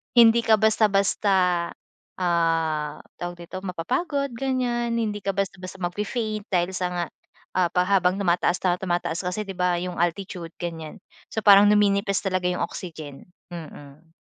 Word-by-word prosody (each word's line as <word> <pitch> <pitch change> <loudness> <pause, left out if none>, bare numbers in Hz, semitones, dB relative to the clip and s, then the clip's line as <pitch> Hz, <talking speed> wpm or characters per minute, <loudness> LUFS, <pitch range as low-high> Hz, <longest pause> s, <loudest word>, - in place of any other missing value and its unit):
hindi 235 -1 +7
ka 220 - +5
basta-basta, 195 -4 +2 0.5
ah, 165 -4 0 0.2
tawag 175 0 -5
dito, 185 - -7
mapapagod 260 - -1
ganyan. 245 -3 -1
Hindi 210 -2 -2
ka 195 - 0
basta-basta 190 -1 -4
magfe-faint 210 +3 -3
dahil 180 0 +1
sa 180 - 0
nga 175 -1 -1 0.5
ah, 180 -1 +4
pa 180 - +3
habang 190 -1 +2
tumataas 175 0 +2
na 180 -2 +3
tumataas 175 -1 -2
kasi, 180 +4 -2
di 195 - -6
ba, 180 -1 +2
yung 180 -1 -4
altitude 175 -1 -2
ganyan. 165 -3 -6 0.3
So - - 0
parang 200 0 +8
numinipis 200 -1 +2
talaga 185 -2 -1
yung 180 0 -1
oxygen. 160 -5 -7 0.2
Mhm. 155 -1 -11
185 Hz, 145 wpm, -24 LUFS, 175-205 Hz, 0.5 s, parang